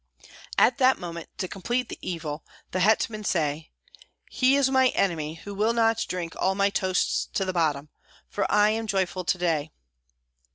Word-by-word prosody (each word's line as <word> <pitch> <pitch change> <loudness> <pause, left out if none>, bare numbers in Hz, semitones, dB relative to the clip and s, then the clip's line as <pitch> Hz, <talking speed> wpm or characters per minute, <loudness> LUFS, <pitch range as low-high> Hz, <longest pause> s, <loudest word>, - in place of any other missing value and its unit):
At 245 - +4
that 260 0 +5
moment, 170 -2 -7
to 185 - -2
complete 240 +7 -2
the - - -8
evil, 155 -3 -5 0.3
the 185 - -1
hetman 215 +2 +2
said, 155 -4 -1 0.6
"He 260 +1 +3
is 280 -2 +3
my 260 -1 +5
enemy 165 -9 -1
who 205 - -7
will 215 +3 +1
not 225 -1 +2
drink 175 -2 -4
all 190 +1 +1
my 200 0 +2
toasts 190 -2 0
to 195 - 0
the 185 - -2
bottom, 150 -4 0 0.4
for 205 - -2
I 210 +1 +4
am 225 0 -2
joyful 190 -2 -1
to 180 - 0
day." 165 -4 0
190 Hz, 170 wpm, -26 LUFS, 170-220 Hz, 0.6 s, that